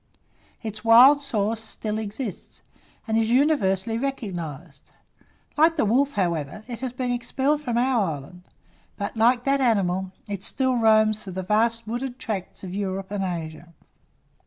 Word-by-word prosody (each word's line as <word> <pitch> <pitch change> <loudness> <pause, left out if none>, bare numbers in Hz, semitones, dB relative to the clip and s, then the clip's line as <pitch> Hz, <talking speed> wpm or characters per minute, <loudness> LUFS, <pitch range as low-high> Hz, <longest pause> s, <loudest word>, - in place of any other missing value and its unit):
Its 215 -1 -6
wild 250 +6 +7
source 220 -4 -1
still 215 -1 -4
exists, 215 -1 -7 0.4
and 220 0 +2
is 225 0 +1
universally 230 - +2
recognized: 175 - -5 0.7
like 325 +2 +4
the 290 - +2
wolf, 270 +7 +2
however, 170 0 -2
it 240 -3 -6
has 260 -1 -3
been 250 0 -3
expelled 270 +4 0
from 240 -5 -2
our 240 -9 +2
island; 145 +6 -12 0.6
but, 200 +2 -4
like 240 +2 +3
that 275 +1 +1
animal, 190 -6 +1 0.2
it 200 -2 -5
still 260 -1 0
roams 215 -1 +4
through 190 -3 -8
the 190 +1 -4
vast 230 +4 +1
wooded 245 +3 -4
tracts 205 -8 -5
of 185 -1 -6
Europe 195 -1 -3
and 205 -1 -2
Asia. 170 -2 -6
220 Hz, 150 wpm, -24 LUFS, 190-250 Hz, 0.7 s, wild